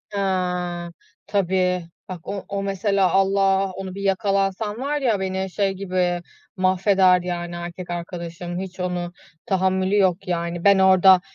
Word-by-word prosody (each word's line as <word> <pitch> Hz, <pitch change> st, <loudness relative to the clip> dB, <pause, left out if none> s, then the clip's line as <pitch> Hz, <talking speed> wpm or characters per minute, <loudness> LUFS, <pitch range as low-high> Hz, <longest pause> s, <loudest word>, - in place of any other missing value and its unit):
Eee. 180 Hz, -3 st, -1 dB, 0.4 s
Tabii. 185 Hz, -2 st, +1 dB, 0.2 s
Bak 180 Hz, -3 st, -8 dB
o 200 Hz, -1 st, -4 dB
o 200 Hz, 0 st, -3 dB
mesela, 195 Hz, -1 st, +1 dB
Allah 195 Hz, 0 st, +2 dB
onu 190 Hz, 0 st, -7 dB
bir 200 Hz, -, -6 dB
yakalansan 195 Hz, +1 st, 0 dB
var 290 Hz, +2 st, -1 dB
ya, 230 Hz, -6 st, +1 dB
beni 190 Hz, 0 st, -2 dB
şey 200 Hz, +1 st, 0 dB
gibi 180 Hz, -2 st, -1 dB, 0.4 s
mahveder, 185 Hz, 0 st, +4 dB
yani 175 Hz, -1 st, -4 dB
erkek 175 Hz, +1 st, -7 dB
arkadaşım. 175 Hz, 0 st, -5 dB
Hiç 190 Hz, 0 st, -7 dB
onu 180 Hz, -1 st, -3 dB, 0.3 s
tahammülü 190 Hz, +1 st, +1 dB
yok 190 Hz, -1 st, +2 dB
yani. 170 Hz, -1 st, -2 dB
Ben 200 Hz, -1 st, +6 dB
orada 190 Hz, -1 st, +6 dB
190 Hz, 135 wpm, -23 LUFS, 180-195 Hz, 0.4 s, Ben